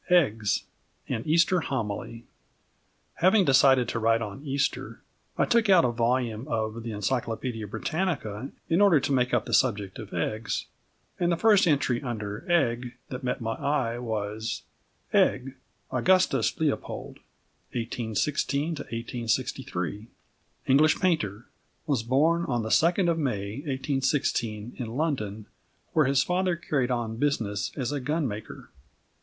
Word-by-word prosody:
XVII 180 - +6
EGGS: 110 - +1 0.5
AN 110 - -1
EASTER 170 +3 +4
HOMILY 115 -4 -4 0.9
Having 190 +2 +4
decided 130 -2 +5
to 115 - -2
write 115 0 +2
on 105 +5 -7
Easter, 140 -1 -2 0.3
I - - +3
took 230 -3 +2
out 185 -6 +6
a 120 - +2
volume 120 0 0
of 110 -2 -2
The 115 - -6
Encyclopædia 115 0 -2
Britannica 135 - -2 0.2
in 165 +4 +2
order 195 -7 +6
to 145 - -2
make 125 -1 +2
up - - +1
the - - -5
subject 105 -6 +1
of - - -8
eggs, 110 -1 -2 0.5
and 175 0 +2
the 170 - +1
first 205 -2 +5
entry 135 -5 +2
under 110 - -5
"Egg" 125 -7 +1
that 125 0 -6
met 125 0 -2
my 115 -1 -2
eye 120 -3 -1
was: 110 -2 -3 0.5
"EGG, 130 +1 +2 0.4
AUGUSTUS 185 0 +2
LEOPOLD 155 -3 -2 0.6
(1816 120 +5 -1
1863), 115 - -3 0.6
English 150 +4 +4
painter, 120 - 0 0.4
was 140 -6 +1
born 150 +9 +2
on 120 -5 -1
the 110 - -3
2nd 175 - +3
of 165 -1 +1
May, 105 -7 -2
1816, 135 -5 -1
in 120 - -3
London, 110 -10 -2 0.5
where 155 - +4
his 135 0 +3
father 180 0 +1
carried 145 -6 -1
on 115 -3 -2
business 115 -8 -1
as 130 -1 -1
a 145 - -1
gun 150 +3 -1
maker." 105 -1 -8
125 Hz, 140 wpm, -27 LUFS, 110-150 Hz, 0.9 s, XVII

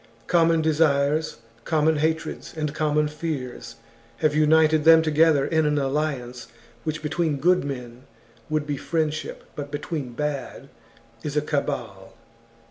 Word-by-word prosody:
Common 165 0 +3
desires, 155 -1 +2 0.3
common 155 +1 +2
hatreds, 160 +1 -2
and 150 -2 -2
common 150 -1 +1
fears, 140 -7 -5 0.4
have 155 -2 +1
united 155 0 +4
them 160 0 +7
together 155 -2 +3
in 160 -2 +1
an 150 0 +1
alliance 135 -3 -2 0.4
which 155 -1 -4
between 155 -1 0
good 180 +6 +3
men 125 -3 -7 0.4
would 155 -1 0
be 145 -1 -3
friendship, 155 0 -2
but 145 -1 -6
between 145 -3 -4
bad 150 +1 -4 0.5
is 150 +2 -4
a - - +4
cabal. 125 -10 -4
150 Hz, 125 wpm, -24 LUFS, 140-160 Hz, 0.5 s, them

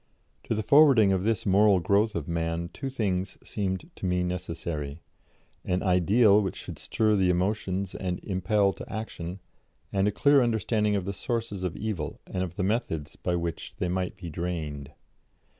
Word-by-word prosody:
" - - -42
To 115 - -1
the 110 - -1
forwarding 135 -7 +6
of 95 -1 +1
this 110 +1 0
moral 100 0 +5
growth 100 +5 +2
of 80 -3 -3
man, 85 0 -2
two 135 - -4
things 95 -7 -2
seemed 95 -3 -3
to 95 - -3
me 90 0 +1
necessary 85 -4 -4 0.6
an 90 0 -1
Ideal 100 +4 +5
which 95 -4 -2
should - - -8
stir 110 -1 +1
the 95 -2 +3
emotions 95 +1 0
and 90 -2 -3
impel 100 +1 +1
to - - -10
action, 95 -4 -5 0.5
and 95 +1 +2
a - - +2
clear 140 +6 +4
understanding 110 -2 +1
of 95 -3 -1
the 100 - -3
sources 115 -2 -3
of 90 -2 -3
evil 105 -9 -4
and 90 - -4
of 90 -2 -4
the 95 - -1
methods 95 -8 -1
by 90 - -1
which 85 -2 -4
they 90 - -1
might 90 0 -2
be 90 -3 -8
drained. 75 -4 -4
95 Hz, 175 wpm, -27 LUFS, 90-105 Hz, 0.6 s, forwarding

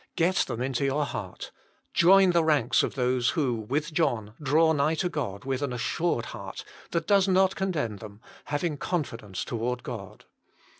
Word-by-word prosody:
Get 180 +3 +2
them 120 - 0
into 130 0 -1
your 140 +2 +1
heart. 95 -9 -6 0.4
Join 190 +2 +6
the 170 -1 +3
ranks 145 -7 +3
of - - -2
those 125 -2 +1
who, 135 -6 +2
with 140 +8 -2
John, 115 -10 0
draw 160 +3 +4
nigh 150 +2 +2
to 180 +2 -1
God 125 - -4
with 135 0 -2
an 140 -3 -1
assured 125 +2 -1
heart, - - -8 0.2
that 165 -1 -1
does 200 0 +4
not 190 0 +3
condemn 155 - -2
them, 105 0 -11 0.3
having 150 +1 -2
confidence 115 - -3
toward 120 +1 -3
God. 110 -6 -8
140 Hz, 165 wpm, -27 LUFS, 120-165 Hz, 0.4 s, Join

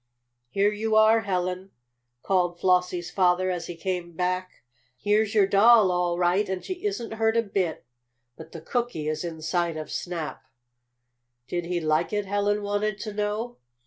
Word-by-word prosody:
"Here 200 +7 +2
you 215 +1 -1
are, 220 +1 +6
Helen!" 185 -2 -2 0.5
called 175 -2 +1
Flossie's 180 -2 +1
father, 185 0 +2
as 175 -2 -4
he 175 - -6
came 175 0 -4
back. 185 0 -3 0.3
"Here's 210 - +1
your 205 -2 +6
doll, 205 0 +6
all 175 -1 0
right, 180 +3 +2
and 190 -1 -3
she 365 -1 -6
isn't 245 - -3
hurt 225 0 +1
a 230 - +3
bit. 190 - -2 0.5
But - - -12
the 165 - -8
cookie 235 -7 -2
is 155 +1 -2
inside 170 0 -2
of 155 - -6
Snap." 170 -4 -4 1.1
"Did 175 +5 -3
he 175 0 -1
like 155 +1 +1
it?" 205 -1 -1
Helen 205 +1 0
wanted 205 0 -1
to 215 -2 -5
know. 210 +3 -3
185 Hz, 160 wpm, -26 LUFS, 175-210 Hz, 1.1 s, are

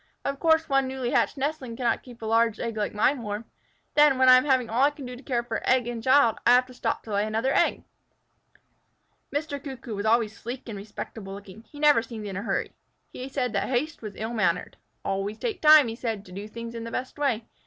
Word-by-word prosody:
Of 275 0 -2
course 320 0 +3
one 270 -1 +2
newly 260 -2 -3
hatched - - +1
nestling 270 -4 -3
cannot 240 -1 0
keep 240 -3 -13
a - - -3
large 230 0 +2
egg 230 -2 -3
like 210 -1 -1
mine 250 +5 +2
warm. 210 +1 -4 0.5
Then, 295 -3 +5
when 260 0 +5
I 255 - +10
am 255 - +1
having 260 -4 +2
all 230 +3 0
I 280 - +6
can 290 -2 -10
do 250 0 -7
to 245 - -12
care 245 -4 -1
for 230 -1 -3
child 255 -2 +2
and 235 0 -5
egg, 260 -4 +5
I - - +7
have 250 0 +4
to 255 - -14
stop 230 -2 -2
to 215 - -7
lay 200 +1 +2
another 225 +5 0
egg." - - +2 1.5
Mr. 290 -1 -3
Cuckoo 260 -4 -7
was 205 +1 -2
always 220 -2 +2
sleek 245 +5 -7
and 220 -3 -6
respectable 195 -1 -8
looking. 200 +2 -12
He 290 - -11
never 295 -5 +5
seemed 225 -2 -8
in 195 -2 -5
a 195 - -3
hurry. - - -2 0.4
He 255 +2 -6
said 250 -4 -2
that 200 - 0
haste 285 +5 -1
was 215 -3 -7
ill 220 +2 -4
mannered. 180 -6 0 0.3
"Always 195 +2 -2
take 450 - -3
time," 305 -3 +8
he 225 - -4
said, 225 -4 -4
"to 180 - -14
do 200 +3 -7
things 230 +1 -7
in 230 -1 -6
the 230 - -5
best 255 +4 -5
way. 245 -6 0
235 Hz, 240 wpm, -26 LUFS, 220-265 Hz, 1.5 s, I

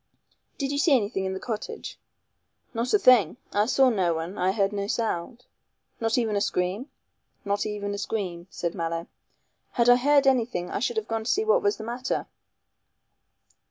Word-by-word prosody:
"Did 275 -1 -2
you 285 - -1
see 295 -1 +5
anything 205 -3 -2
in 190 - -2
the - - -4
cottage?" 245 - -6 0.7
"Not 235 +1 -1
a - - +6
thing. 255 - +5 0.2
I 205 +1 +2
saw 265 +1 +4
no 180 -6 +1
one 165 +4 -4
I 185 -1 +1
heard 200 0 0
no 200 -1 -2
sound." 230 +3 -2 0.5
"Not 225 +1 +1
even 225 -4 +1
a 200 - +1
scream?" 190 +8 -1 0.6
"Not 200 +1 0
even 205 -1 -3
a 200 - -4
scream," 185 -5 -4
said 170 -2 -3
Mallow; 165 -1 -3 0.7
"had 240 -1 +3
I 245 - +8
heard 285 +2 +4
anything 235 -9 +1
I - - -1
should 240 0 -1
have 220 0 -1
gone 225 -1 -2
to - - -2
see 425 +3 +2
what 455 +3 +4
was 410 0 +1
the - - -7
matter." 245 +3 -3
220 Hz, 185 wpm, -26 LUFS, 195-250 Hz, 0.7 s, I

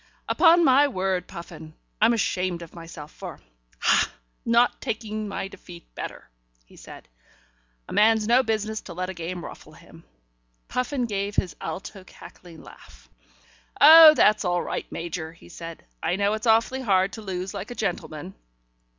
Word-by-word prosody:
"Upon 340 0 +5
my 280 +1 +5
word, 185 -6 -2
Puffin, 160 -2 -10 0.3
I'm 225 +2 +5
ashamed 180 -5 -1
of 165 - -13
myself 165 -3 -10
for - - -9 0.4
ha! - - +3
for - - -14
not 235 +1 +3
taking 215 -1 -4
my 195 -1 -4
defeat 175 -3 -14
better," - - -8 0.4
he - - -20
said. - - -13 0.8
"A - - -8
man's 220 0 +3
no 240 +3 +5
business 220 -2 -2
to 170 - -10
let 185 +1 -3
a - - -8
game 170 0 -6
ruffle 155 - -12
him." 165 0 -17 0.6
Puffin 250 0 -2
gave 200 -2 -3
his 180 -5 -1
alto 190 +4 -7
cackling 175 -2 -14
laugh. - - -17 0.7
"Oh, 315 +1 +10
that's 210 -5 +4
all 175 -1 0
right, - - -5
Major," 165 -1 -5
he 165 - -18
said. 165 -1 -10 0.2
"I 180 - 0
know 200 +1 +1
it's 220 +2 -3
awfully 230 +4 +2
hard 195 -4 +1
to 220 - -8
lose 190 -1 -5
like 200 +3 -6
a 245 - -7
gentleman." 155 - -4
190 Hz, 160 wpm, -24 LUFS, 170-225 Hz, 0.8 s, Oh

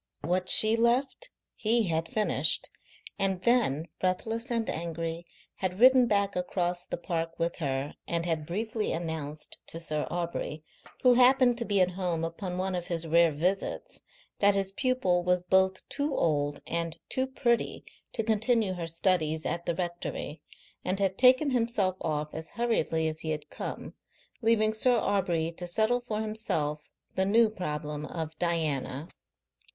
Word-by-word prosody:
What 180 +3 0
she 220 +1 +8
left 255 - +1 0.3
he 230 +1 +2
had 165 -3 -1
finished, 215 -1 0 0.5
and 190 -2 0
then, 200 - +2
breathless 225 +5 -1
and 230 -2 -1
angry, 165 0 -4 0.3
had 185 0 -3
ridden 255 0 +7
back 200 -2 +1
across 180 -1 -1
the - - -3
park 165 -1 -3
with 170 0 -1
her 140 -2 -2
and 170 0 -1
had 160 -3 -2
briefly 215 +4 -2
announced 155 -3 -5
to 165 - -5
Sir 155 -2 -2
Aubrey, 170 -3 -4 0.4
who 250 -1 +7
happened 250 0 +5
to 235 - -2
be 200 -2 +2
at 180 0 +3
home 175 -3 -2
upon 180 +2 -5
one 190 +1 -1
of 175 -1 -3
his 170 -1 -2
rare 165 +1 +4
visits, 180 +7 -2 0.4
that 200 0 +4
his 195 -1 +1
pupil 195 -7 +1
was 180 0 +1
both 190 +1 +2
too 285 -1 -2
old 145 -2 0
and 165 -1 -2
too 260 0 0
pretty 240 -3 0 0.3
to 225 - -1
continue 220 -1 +1
her 175 -2 -5
studies 165 -2 +1
at 170 0 -3
the 170 - 0
rectory, 175 -3 -4 0.4
and 185 +1 -1
had 195 -1 +1
taken 260 +4 +5
himself 230 -6 +1
off 150 -1 -2
as 160 0 -6
hurriedly 165 -9 +1
as 155 0 -3
he 160 - -4
had 150 -1 -4
come, - - -6 0.5
leaving 220 -1 +3
Sir 245 +3 +3
Aubrey 175 -7 0
to 175 +1 -6
settle 220 +7 +1
for 220 -3 -3
himself 160 -9 -2 0.2
the 190 - +1
new 220 +3 +4
problem 150 -5 -4
of 160 -1 -5
Diana. 155 -4 -1
180 Hz, 155 wpm, -29 LUFS, 165-220 Hz, 0.5 s, she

